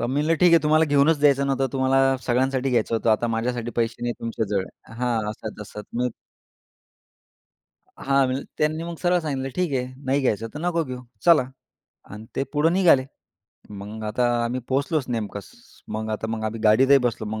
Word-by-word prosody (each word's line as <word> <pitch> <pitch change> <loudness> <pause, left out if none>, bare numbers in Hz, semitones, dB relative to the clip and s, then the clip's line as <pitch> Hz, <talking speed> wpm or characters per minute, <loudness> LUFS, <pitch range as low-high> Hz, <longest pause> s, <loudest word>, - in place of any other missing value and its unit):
तर 120 - 0
मी 130 - -3
म्हटलं 160 +2 +2
"ठीक 180 -1 +6
आहे 165 -2 +6
तुम्हाला 155 +1 +4
घेऊनच 145 +1 +3
द्यायचं 140 -1 +4
नव्हतं. 135 -1 +1
तुम्हाला 135 0 +2
सगळ्यांसाठी 130 +2 +1
घ्यायचं 115 -2 +1
होतं 115 0 +1
आता 110 +2 +2
माझ्यासाठी 120 +1 -2
पैसे 115 0 -1
नाही 120 0 -1
तुमच्याजवळ." 105 -4 -2 0.3
हां. 115 -3 -1
असं-तसं. 105 -1 -8
मग 125 +1 0 1.9
हां. 135 0 +2
मग 130 +2 -2 0.2
त्यांनी 155 +1 0
मग 170 0 -5
सरळ 180 0 +3
सांगितलं 135 -4 -3
"ठीक 180 -4 0
आहे 125 - -3 0.2
नाही 135 +2 +1
घ्यायचं 115 -4 -1
तर - - -5
नको 170 0 0
घेऊ 130 -2 -6 0.2
चला." 170 -6 +6 0.7
आणि 105 +2 -9
ते - - +1
पुढे 155 +2 +2
निघाले. 170 -7 +4 0.7
मग 105 +2 -8
आता 110 +4 0 0.2
आम्ही 125 +2 -2
पोहोचलोच 140 +2 0
नेमकंच. 105 -4 -4 0.4
मग 110 0 -4
आता 110 +1 -3
मग 110 -1 -3
आम्ही 110 +1 -3
गाडीतही 130 +6 +6
बसलो. 110 -2 -6
मग 110 +1 -4
130 Hz, 175 wpm, -24 LUFS, 110-145 Hz, 1.9 s, ठीक